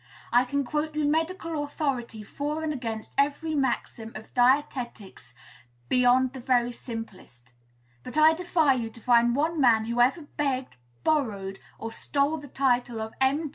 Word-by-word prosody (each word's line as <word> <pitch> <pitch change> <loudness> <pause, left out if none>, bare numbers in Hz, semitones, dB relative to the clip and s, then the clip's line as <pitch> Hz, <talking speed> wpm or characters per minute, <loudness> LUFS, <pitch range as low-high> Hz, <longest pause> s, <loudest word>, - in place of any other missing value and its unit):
I 245 +1 +5
can 280 +2 -1
quote 300 +3 -2
you 305 -1 +1
medical 325 0 -1
authority 260 -7 -3
for 295 +8 -4
and 310 -1 -1
against 225 -5 -5
every 295 +3 +1
maxim 240 -5 -2
of 220 - -10
dietetics 245 - 0 0.5
beyond 250 +1 +4
the 265 - -7
very 245 -1 +2
simplest; 195 - -9 0.5
but 250 - -8
I 310 +1 +7
defy 320 -4 +2
you 235 -3 -3
to 225 - -15
find 240 0 +4
one 315 +2 0
man 225 -4 +4
who 235 +1 0
ever 275 +7 +3
begged, 275 -3 -3 0.3
borrowed, 205 -11 0 0.2
or 225 - -6
stole 285 +6 0
the 290 -1 -9
title 245 -3 0
of 220 0 -5
M. 285 +4 +2
260 Hz, 155 wpm, -27 LUFS, 235-295 Hz, 0.5 s, I